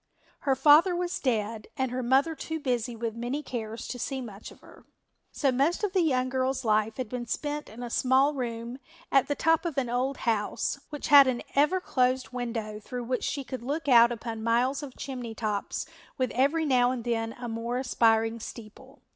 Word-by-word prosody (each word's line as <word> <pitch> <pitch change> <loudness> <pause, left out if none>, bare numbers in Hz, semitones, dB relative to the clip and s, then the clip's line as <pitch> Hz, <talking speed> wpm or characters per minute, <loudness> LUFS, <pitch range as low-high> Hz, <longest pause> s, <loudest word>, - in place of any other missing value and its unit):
Her 270 -2 +1
father 310 +7 +6
was 355 0 -2
dead 220 -4 -1
and 260 -2 -1
her 255 +1 -2
mother 265 +6 +3
too 320 0 -5
busy 245 -4 -1
with 225 0 -3
many 245 +6 -3
cares 225 -4 -5
to 245 - -5
see 270 +2 -3
much 220 -5 -8
of - - -17
her, - - -17 0.5
so 275 -3 +1
most 280 +10 +1
of 405 -2 0
the 375 - +3
young 255 -6 +2
girl's 260 0 -1
life 215 0 +1
had 255 - -3
been 240 +1 -5
spent 295 +4 -3
in 235 +3 -9
a 240 - -5
small 265 +4 +3
room 240 -1 -4 0.3
at 270 -2 +4
the 290 - -1
top 325 +2 +2
of 330 -5 -4
an 250 -3 0
old 260 +3 0
house, 225 +4 0
which 295 - -5
had 280 -2 +9
an 250 -2 -1
ever 300 +7 +3
closed 255 -6 0
window 230 -4 -4
through 245 +3 -6
which 250 +1 -2
she 280 - -2
could 260 0 -6
look 290 +5 -3
out 235 -2 +7
upon 230 -1 -5
miles 240 +5 +1
of 275 -4 -9
chimney 245 -4 -6
tops 210 -3 -2 0.3
with 255 -1 0
every 285 +6 +2
now 250 -3 +4
and 250 -2 -3
then 225 -1 -1
a 245 0 -7
more 230 +2 -3
aspiring 225 -3 +2
steeple. 235 +5 -11
250 Hz, 200 wpm, -28 LUFS, 230-275 Hz, 0.5 s, had